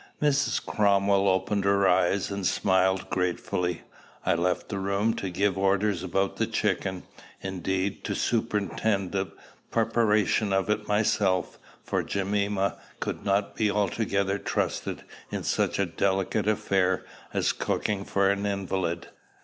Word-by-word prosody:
Mrs. 140 -5 +1
Cromwell 100 -1 +3
opened 95 +2 +1
her 100 0 +3
eyes 95 +2 +2
and 100 0 -3
smiled 95 0 +2
gratefully. 90 -1 -1 0.4
I - - +3
left 90 +1 0
the 100 - -3
room 100 +3 +1
to 95 - -3
give 95 +1 0
orders 100 -1 +2
about 95 0 -1
the - - +1
chicken, 95 -1 -1 0.4
indeed, 95 +1 -2
to - - -1
superintend 105 -3 0
the 95 -1 -1 0.4
preparation 105 -2 +2
of 95 +2 +1
it 105 0 -1
myself; 105 -4 +1 0.2
for - - 0
Jemima 100 0 0 0.2
could - - -4
not 100 +1 +1
be 110 -2 +2
altogether 100 -1 0
trusted - - -2 0.3
in - - -4
such - - 0
a 100 - +2
delicate 95 +3 0
affair 95 -3 +1 0.3
as - - +1
cooking 100 -2 -1
for 100 0 +1
an 100 +1 -1
invalid. 95 -4 -2
100 Hz, 135 wpm, -27 LUFS, 95-105 Hz, 0.4 s, Cromwell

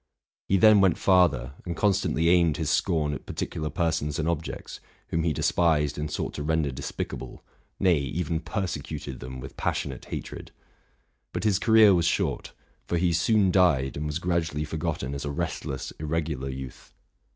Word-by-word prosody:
He 95 - +3
then 105 0 +7
went 95 -2 +4
farther, 85 -10 +3
and 85 -2 -5
constantly 95 -5 +1
aimed 85 -4 +4
his 75 -2 -1
scorn 75 -4 +1
at - - -7
partic - - -3
ular 75 -2 -4
persons 80 -3 -1
and 80 - -1
objects, 85 -2 -4 0.3
whom 80 - 0
'he 80 -1 +1
despised 75 -1 +2
and 75 +1 -3
sought 75 - -3
to - - -5
render 80 -1 0
despicable, 65 +2 -6 0.2
— - - -41
nay, 90 -5 +4
even 80 +4 -2
persecuted 75 - -4
them 65 +1 -7
with 65 +1 -9
passion - - -1
ate 65 - -10
hatred. - - -7 0.8
But - - -3
his 105 -3 +2
career 110 -3 +6
was 85 -1 +2
short; - - -1 0.4
for 85 - 0
he 85 0 +2
soon 95 +3 +3
died, 80 -8 +3
and 75 +1 -3
was 75 - -2
gradually 85 -4 -1
forgotten 80 -4 -3
as 70 - -4
a 70 - -3
restless, 70 -2 -4
irregular 75 -3 -2
youth. 65 -1 -9
80 Hz, 175 wpm, -26 LUFS, 75-90 Hz, 0.8 s, then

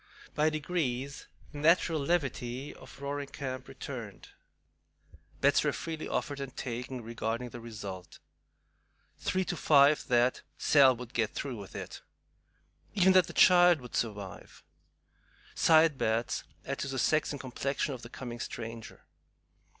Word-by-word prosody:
By 150 +1 +3
degrees 145 -4 -3 0.2
the 145 - -8
natural 165 +1 +3
levity 140 -4 -2
of - - -14
Roaring 140 0 -4
Camp 130 -2 -6
returned. 125 -6 -8 1.1
Bets - - +4
were - - +2
freely 160 -1 -5
offered 140 -1 -2
and 135 -2 -7
taken 125 +1 -4
regarding 115 +1 -3
the 120 - -9
result. 100 -5 -8 1.0
Three 185 0 0
to 175 - -2
five 145 -2 +4
that 125 0 +2 0.2
"Sal 135 -3 +5
would 120 0 -9
get 110 -2 0
through 135 -4 -4
with 100 -2 -10
it;" - - -7 0.9
even 190 -1 +5
that 185 -3 +5
the - - -7
child 175 -2 +6
would 125 -2 -9
survive; 105 -4 -4 0.9
side 160 -3 +4
bets 115 +2 0 0.2
as 140 0 -3
to - - -3
the 135 -1 -4
sex 155 +5 +2
and 145 - -5
complexion 135 +2 -2
of 125 - -8
the 120 - -10
coming 120 -1 -7
stranger. 115 -1 -7
135 Hz, 140 wpm, -30 LUFS, 120-150 Hz, 1.1 s, child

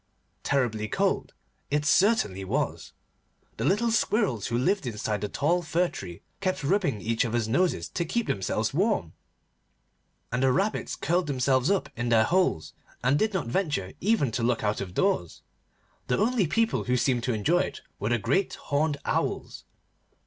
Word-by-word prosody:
Terribly 115 -6 0
cold - - -1 0.3
it 150 +1 0
certainly 180 - +3
was. 95 - -2 0.6
The - - -2
little 230 +4 +2
Squirrels, 210 - +1
who 120 - -1
lived 185 +5 +1
inside 105 -2 -2
the 105 - -2
tall 170 - +1
fir 175 +2 +1
tree, 85 -3 -9 0.2
kept 185 -5 -1
rubbing 150 - +1
each 115 +2 +1
other's 120 -2 -1
noses 175 +10 +1
to 170 - -2
keep 230 +8 -1
themselves 105 +4 -1
warm, 175 - 0 1.2
and 125 +2 0
the 130 -1 +4
Rabbits 195 +9 0
curled 175 +1 0
themselves 130 -1 +2
up 200 -2 +1
in 120 0 -2
their 115 -2 +5
holes, 170 - +1 0.3
and 135 +4 +3
did 220 - +2
not 190 - 0
venture 120 - -1
even 200 - +2
to 115 - -2
look 115 -1 +1
out 105 0 0
of 95 -2 -6
doors. 190 - 0 0.6
The 125 - +1
only 220 -4 +2
people 225 +7 +1
who 125 0 +1
seemed 125 0 +1
to 125 - 0
enjoy 150 +12 +2
it - - -3 0.2
were 105 - -1
the 120 - +2
great 140 - 0
horned 145 +1 -1
Owls. - - -2
135 Hz, 165 wpm, -27 LUFS, 115-185 Hz, 1.2 s, their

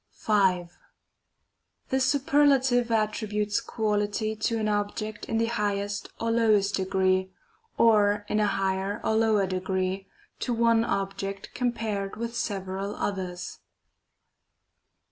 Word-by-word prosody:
5. 185 -5 +1 1.1
The 265 - +1
superlative 265 -2 +3
attributes 210 -2 0
quality 215 0 -1
to 220 +2 -1
an 215 -1 -1
object 210 +1 -2
in 225 - -1
the 230 - +2
highest 205 -3 -2
or 230 0 0
lowest 215 -3 +3
degree, 190 0 +1 0.5
or 205 -2 +4
in 210 - 0
a 210 - +3
higher 195 0 -1
or - - +1
lower 220 -3 +3
degree, 185 +1 -2 0.3
to 245 - -1
one 230 0 +3
object 195 -1 -3
compared 220 -5 -2
with 235 +1 -5
several 195 -2 -3
others. 185 -3 -4
210 Hz, 110 wpm, -27 LUFS, 195-225 Hz, 1.1 s, or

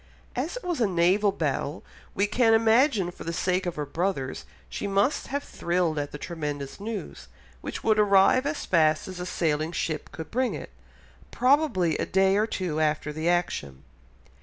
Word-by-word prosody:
As 300 - -2
it - - -9
was 350 -7 -2
a 225 - +4
naval 190 +3 +3
battle, 150 -2 -2 0.3
we 200 - +2
can 225 +2 +3
imagine 225 - +3
for - - -10
the 165 - -3
sake 185 +2 0
of 175 - -3
her 150 - -3
brothers 150 -3 -2 0.2
she - - -4
must 200 +8 +1
have 285 +1 -3
thrilled 170 -3 -1
at 145 0 -4
the - - -6
tremendous 150 -3 -5
news, 215 +1 -6 0.3
which - - -6
would 215 -1 +3
arrive 205 +6 +5
as 295 +1 -3
fast 155 -3 +2
as 185 -1 -7
a 180 - -4
sailing 155 -2 0
ship 160 -2 -3
could 160 -1 -8
bring 250 -3 0
it—probably 160 - -1
a - - -1
day 190 0 +3
or 210 +2 +2
two 180 -8 -2
after 150 -1 0
the 160 +3 -1
action. 70 - -1
180 Hz, 175 wpm, -26 LUFS, 155-215 Hz, 0.3 s, arrive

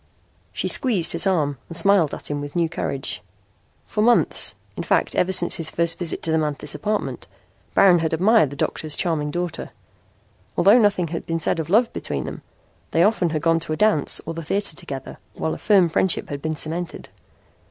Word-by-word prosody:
She - - -2
squeezed 200 -10 +2
his 170 +3 +1
arm 145 -8 0
and 165 - -2
smiled 195 -7 +4
at - - -7
him 145 0 -3
with 145 +2 -8
new 170 -1 +2
courage. 140 -4 -3 0.6
For 210 - -2
months, 240 +2 +3 0.2
in - - -4
fact - - +1
ever 180 - +1
since 175 -2 +3
his 160 -1 -2
first 170 0 -1
visit 175 -3 -4
to 160 - 0
the 160 - +2
Manthis 150 -2 -2
apartment, 205 +8 -3 0.5
Baron 180 -3 +6
had 160 -1 -1
admired 190 - +3
the 140 - -8
doctor's 155 +1 -2
charming 160 -4 -1
daughter. 175 +2 -4 0.9
Although 200 +7 +6
nothing 200 -6 +2
had 165 0 -5
been 165 0 -1
said 165 - 0
of 160 0 -4
love 225 +5 +3
between - - -3
them - - -7 0.5
they 165 - +2
often 195 -4 +2
had 155 -1 -3
gone 165 0 +3
to 155 -1 -3
a - - -3
dance 210 -9 +3
or - - -4
the 165 - -6
theater 195 +2 -2
together, 135 -3 -7 0.2
while 160 - -2
a - - -7
firm 195 -5 +4
friendship 170 +2 0
had 140 -1 -5
been 155 +1 -2
cemented. 165 +3 -5
165 Hz, 195 wpm, -22 LUFS, 155-190 Hz, 0.9 s, Baron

